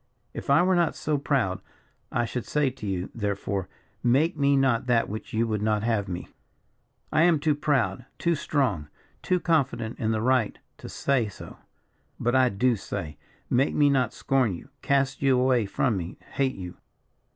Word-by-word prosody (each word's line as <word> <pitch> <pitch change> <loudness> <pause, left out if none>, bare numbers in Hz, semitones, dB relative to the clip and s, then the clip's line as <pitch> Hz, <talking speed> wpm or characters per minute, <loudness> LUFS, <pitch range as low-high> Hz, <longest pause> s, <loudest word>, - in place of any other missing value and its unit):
If - - -7
I 140 +5 +5
were 185 +1 +3
not 170 -3 +2
so 150 -2 -1
proud, 130 -10 0 0.5
I 120 - +1
should 120 0 -5
say 150 -3 +1
to 125 -5 -8
you, 95 -1 -3
therefore, 100 -3 -2 0.3
'Make 140 +8 +3
me 140 -1 +3
not 130 -2 +2
that 120 -2 +3
which 110 +5 -6
you 115 -1 +1
would 105 -2 -1
not 105 -1 +1
have 110 -3 0
me!' 90 -1 -5 0.8
I 155 - +3
am 170 -1 +5
too 150 +1 +1
proud, 135 -7 0
too 170 - +1
strong, 130 - 0 0.3
too 180 - +1
confident 130 -9 0
in 110 - 0
the 110 -1 +1
right 125 -4 +2 0.2
to - - -9
say 135 -5 0
so. 100 - -11 0.6
But 120 +1 0
I 130 -1 +5
do 120 +4 +2
say, 75 -6 -6 0.3
'Make 130 +3 +1
me 145 -1 +4
not 130 -4 +2
scorn 130 -8 +1
you, 85 - -12
cast 135 -1 +1
you 135 -2 +4
away 125 -4 +2
from 110 +1 0
me, 85 0 -6
hate 135 -1 0
you.' 90 -2 -8
125 Hz, 180 wpm, -26 LUFS, 105-140 Hz, 0.8 s, I